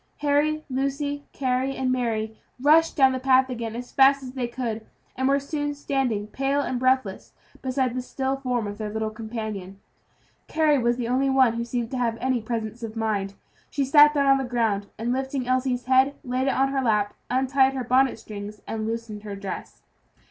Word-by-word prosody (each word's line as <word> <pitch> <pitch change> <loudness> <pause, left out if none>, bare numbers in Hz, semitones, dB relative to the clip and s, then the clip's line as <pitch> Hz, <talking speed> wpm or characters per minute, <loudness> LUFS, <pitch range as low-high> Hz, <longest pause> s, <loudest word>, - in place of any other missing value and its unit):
Harry, 300 +1 +2
Lucy, 280 +2 -2
Carry, 260 0 -1
and 260 -1 0
Mary, 220 -3 -1 0.2
rushed 315 +4 +4
down 265 -2 +5
the 260 - -2
path 260 0 +3
again 230 -2 -4
as 245 +1 -7
fast 275 0 +5
as 255 - -7
they 255 -2 -3
could, 235 -3 -4 0.3
and 260 +1 0
were 275 +1 +3
soon 290 +1 -3
standing 265 -7 -1
pale 275 +5 -1
and 255 -3 -2
breathless 255 -6 0 0.3
beside 260 -1 0
the 255 - -2
still 265 +1 -2
form 250 -4 -1
of 205 +1 -6
their 215 -1 -3
little 220 0 -2
companion. 215 -4 -6 0.7
Carry 305 -3 +3
was 240 0 +1
the 240 -2 -2
only 260 +3 +1
one 260 -3 +4
who 235 0 -2
seemed 235 0 -3
to 260 - -2
have 230 -2 0
any 255 -2 0
presence 225 0 -4
of 225 -1 -6
mind. 205 -3 -1 0.3
She 280 -1 -1
sat 295 +2 +7
down 280 -1 +3
on 270 0 +5
the - - -1
ground, 225 -5 0
and 235 +2 -1
lifting 265 -1 -2
Elsie's 255 -1 0
head, 260 +2 +4
laid 255 0 -1
it 270 - +1
on 270 +1 +2
her 270 0 0
lap, 210 -4 +1 0.2
untied 265 +1 +3
her 260 - -2
bonnet 255 +2 +3
strings, 210 -1 -8
and 220 -1 -3
loosened 225 -2 -4
her 205 -1 -6
dress. 195 -1 -7
255 Hz, 195 wpm, -25 LUFS, 225-270 Hz, 0.7 s, sat